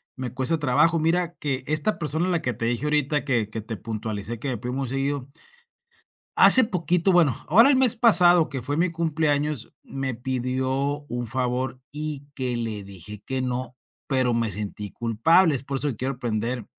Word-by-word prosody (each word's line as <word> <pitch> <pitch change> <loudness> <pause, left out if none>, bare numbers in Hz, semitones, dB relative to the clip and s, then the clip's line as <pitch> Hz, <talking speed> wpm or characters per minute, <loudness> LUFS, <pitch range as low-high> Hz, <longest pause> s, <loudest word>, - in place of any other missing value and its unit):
me 130 -3 -5
cuesta 135 +6 +1
trabajo. 155 +4 +2
Mira 170 +2 0
que 135 -3 -3
esta 155 +8 0
persona 160 +3 -1
a - - -1
la 170 - 0
que 125 - -1
te 115 - -4
dije 120 +5 -1
ahorita 150 -1 0
que 120 -6 0
que 110 0 -5
te 110 +1 -7
puntualicé 110 +1 -5
que 135 +3 -4
me 125 - -2
pide 125 0 -5
muy 135 -1 -3
seguido. 135 +1 -3 1.1
Hace 260 - +9
poquito 180 -2 0
bueno, 165 -8 +3
ahora 230 - +6
el 285 - +4
mes 255 -3 +4
pasado 180 -8 +5
que 130 -3 -5
fue 145 +4 -3
mi 170 +1 +1
cumpleaños, 150 -5 -1
me 135 -2 -4
pidió 130 +3 -2
un 120 0 -4
favor, 130 +1 -2
y 150 -1 -5
que 125 -3 -2
le 110 -3 -2
dije 100 +1 -8
que 130 -1 -2
no, 125 0 -4 0.3
pero 130 -3 +1
me 115 -1 +1
sentí 105 +1 -4
culpable. 140 - +2
Es 130 - -3
por 140 0 -4
eso 145 +2 0
que 130 - -4
quiero 130 +3 -2
aprender 120 -1 -2
135 Hz, 190 wpm, -24 LUFS, 120-155 Hz, 1.1 s, Hace